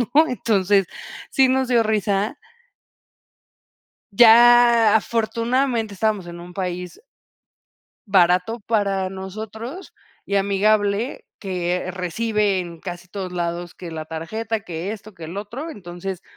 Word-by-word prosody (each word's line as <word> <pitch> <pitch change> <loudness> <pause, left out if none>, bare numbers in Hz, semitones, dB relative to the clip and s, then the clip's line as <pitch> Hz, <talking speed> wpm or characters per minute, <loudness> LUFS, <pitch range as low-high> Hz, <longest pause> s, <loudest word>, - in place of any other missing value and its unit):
¿no?, 315 +1 +6
entonces, 200 - +2 0.4
sí 270 -1 +4
nos 260 0 +1
dio 240 -2 +3
risa 210 +3 0 1.7
Ya 235 0 +7
afortunadamente, 230 +1 0
estábamos 205 -2 0
en 170 0 -9
un 175 +1 -11
país 180 -2 -4 1.1
barato 185 +4 +3
para 200 -3 0
nosotros 220 - -7 0.3
y 200 - -1
amigable, 205 +4 +1
que 180 -1 -2
recibe 205 +2 0
en 170 -2 -6
casi 175 -1 -7
todos 185 -1 -6
lados 175 0 -3
que 175 -2 -9
la 160 -1 -5
tarjeta, 205 +8 -4
que 175 +2 -5
esto, 215 -1 -10
que 165 -3 -10
el 165 +4 -7
otro. 235 +11 -6
Entonces, 185 - -7
200 Hz, 115 wpm, -22 LUFS, 180-225 Hz, 1.7 s, Ya